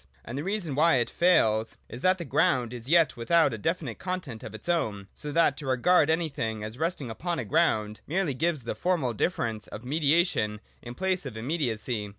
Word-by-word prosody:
And 120 - -6
the 140 - -3
reason 195 -5 -2
why 160 +4 +4
it 120 -2 0
fails 110 -11 +2
is 120 - -9
that 185 0 +3
the 170 - -6
ground 125 -3 +1
is 120 +1 -8
yet 165 -3 +4
without 160 +5 +3
a - - -3
definite 155 - -2
content 180 -11 -4
of 110 -4 -8
its 110 - -10
own; 105 - -1
so 150 - -6
that 155 -2 +3
to 145 - -7
regard 145 +5 +3
anything 140 -10 -1
as 110 +4 -7
resting 160 -7 -2
upon 170 +9 -3
a - - -3
ground 110 -10 +1
merely 175 -2 0
gives 160 0 0
the 115 - -3
formal 165 -10 0
difference 115 - -2
of 110 +3 -9
mediation 145 - +1 0.2
in 120 0 -8
place 185 -3 -1
of 120 - -8
imme 135 +10 -3
diacy. 110 -1 -3
140 Hz, 200 wpm, -27 LUFS, 115-170 Hz, 0.2 s, why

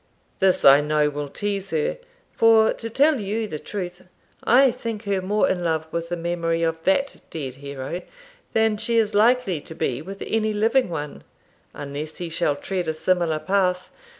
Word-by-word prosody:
This 190 -1 +2
I 140 +1 +8
know 150 0 +1
will 145 0 -5
tease 200 +3 -3
her; - - -1 0.3
for, 225 -1 +5
to 230 - -5
tell 280 +4 +3
you 215 +2 -2
the 155 -6 -5
truth, 180 -2 -6 0.4
I 260 +2 +5
think 230 -3 -5
her 200 -2 -1
more 205 +3 +1
in 180 -1 -1
love 160 -2 0
with 170 0 -3
the 175 - -1
memory 170 -1 -1
of 165 0 -1
that 275 +9 +1
dead 140 -5 -5
hero 140 +4 -5 0.5
than 220 -1 +2
she 230 +2 0
is 220 -2 +2
likely 215 -5 +3
to 160 - -10
be 130 -5 -2
with 195 +4 -7
any 220 -1 0
living 225 +3 +2
one, 150 -3 -5 0.5
unless 145 +2 -6
he 175 -1 -5
shall 155 -3 0
tread 180 +3 -3
a 160 - -1
similar 165 0 +1
path. 185 +1 0
185 Hz, 175 wpm, -23 LUFS, 160-220 Hz, 0.5 s, I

